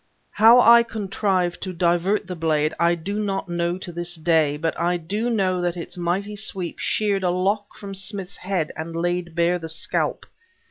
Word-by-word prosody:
How 225 Hz, +4 st, +7 dB
I 235 Hz, -1 st, +8 dB
contrived 195 Hz, -5 st, -1 dB
to 185 Hz, -1 st, -4 dB
divert 175 Hz, +4 st, +1 dB
the 180 Hz, 0 st, -6 dB
blade, 155 Hz, -2 st, +1 dB
I 170 Hz, 0 st, +3 dB
do 170 Hz, +4 st, -5 dB
not 195 Hz, -2 st, -2 dB
know 175 Hz, 0 st, -1 dB
to 185 Hz, -1 st, -8 dB
this 175 Hz, +1 st, -3 dB
day; 160 Hz, -3 st, +2 dB
but 165 Hz, +1 st, -2 dB
I 175 Hz, +1 st, +1 dB
do 205 Hz, +8 st, -2 dB
know 190 Hz, -5 st, +1 dB
that 175 Hz, 0 st, -1 dB
its 170 Hz, -, -7 dB
mighty 185 Hz, +4 st, -2 dB
sweep 195 Hz, -4 st, -4 dB
sheared 205 Hz, -2 st, 0 dB
a 180 Hz, -, +1 dB
lock 200 Hz, +3 st, -1 dB
from 200 Hz, -1 st, -8 dB
Smith's 195 Hz, 0 st, -4 dB
head 185 Hz, -5 st, -2 dB
and 165 Hz, +1 st, -6 dB
laid 175 Hz, 0 st, -2 dB
bare 170 Hz, +1 st, +2 dB
the 165 Hz, -1 st, -6 dB
scalp. 160 Hz, +1 st, -1 dB
180 Hz, 185 wpm, -23 LUFS, 170-200 Hz, -, I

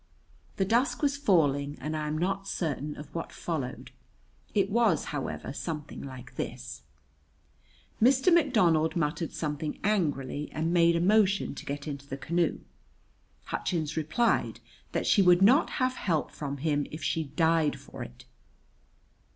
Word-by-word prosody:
The 195 Hz, -, +1 dB
dusk 240 Hz, +9 st, +1 dB
was 280 Hz, -1 st, +2 dB
falling 145 Hz, -, +2 dB
and 155 Hz, +1 st, -3 dB
I 155 Hz, -1 st, -2 dB
am 150 Hz, +1 st, -2 dB
not 195 Hz, +3 st, -1 dB
certain 150 Hz, -5 st, -3 dB
of 150 Hz, -, -10 dB
what 165 Hz, -, -4 dB
followed. 150 Hz, -7 st, -4 dB, 0.6 s
It 200 Hz, -1 st, +2 dB
was, 220 Hz, -6 st, +3 dB
however, 135 Hz, -1 st, -4 dB
something 150 Hz, -1 st, -5 dB
like 130 Hz, -2 st, -10 dB
this: 125 Hz, 0 st, -5 dB, 1.2 s
Mr. 265 Hz, +8 st, +5 dB
McDonald 185 Hz, -, +3 dB
muttered 165 Hz, 0 st, -1 dB
something 150 Hz, -1 st, -3 dB
angrily 150 Hz, -8 st, 0 dB
and 160 Hz, +2 st, -1 dB
made 170 Hz, -1 st, +5 dB
a -, -, +2 dB
motion 195 Hz, +1 st, +3 dB
to -, -, -9 dB
get 145 Hz, +2 st, -4 dB
into 140 Hz, -1 st, -6 dB
the 135 Hz, -, -5 dB
canoe. 170 Hz, +3 st, 0 dB, 0.8 s
Hutchins 160 Hz, -3 st, -2 dB
replied 165 Hz, +10 st, +1 dB, 0.3 s
that -, -, -1 dB
she 205 Hz, -, +5 dB
would 180 Hz, 0 st, +6 dB
not 255 Hz, +9 st, +5 dB
have 255 Hz, -1 st, 0 dB
help 165 Hz, -6 st, -1 dB
from 140 Hz, -2 st, -5 dB
him 145 Hz, 0 st, 0 dB
if 155 Hz, -1 st, -8 dB
she 160 Hz, +2 st, 0 dB
died 160 Hz, +1 st, +1 dB
for -, -, -10 dB
it. 60 Hz, 0 st, -9 dB
160 Hz, 145 wpm, -29 LUFS, 145-195 Hz, 1.2 s, would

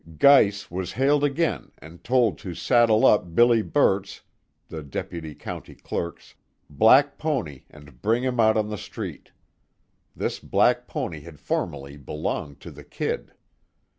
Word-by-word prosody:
Geiss 105 Hz, -, +4 dB
was 90 Hz, 0 st, -4 dB
hailed 140 Hz, +4 st, +2 dB
again 150 Hz, +3 st, -1 dB
and 80 Hz, +2 st, -14 dB
told 125 Hz, -4 st, +2 dB
to 90 Hz, -3 st, -7 dB
saddle 115 Hz, -1 st, +3 dB
up 90 Hz, -5 st, +3 dB
Billy 120 Hz, -1 st, +5 dB
Burt's, 100 Hz, -6 st, 0 dB, 0.5 s
the 80 Hz, -, -7 dB
Deputy 75 Hz, +2 st, -6 dB
County -, -, -8 dB
Clerk's, 85 Hz, -, -6 dB, 0.4 s
black 130 Hz, -, +4 dB
pony 120 Hz, -, -3 dB
and 75 Hz, -4 st, -17 dB
bring 115 Hz, +4 st, +1 dB
him 125 Hz, -2 st, -2 dB
out 110 Hz, -1 st, +4 dB
on 105 Hz, -1 st, 0 dB
the 105 Hz, -, -4 dB
street. -, -, -8 dB, 0.9 s
This -, -, -3 dB
black -, -, +1 dB
pony 80 Hz, -, -4 dB
had 75 Hz, -1 st, -13 dB
formerly 70 Hz, -1 st, -4 dB
belonged 70 Hz, 0 st, -5 dB
to -, -, -10 dB
the -, -, -13 dB
"Kid." -, -, -4 dB
100 Hz, 140 wpm, -24 LUFS, 80-125 Hz, 0.9 s, Billy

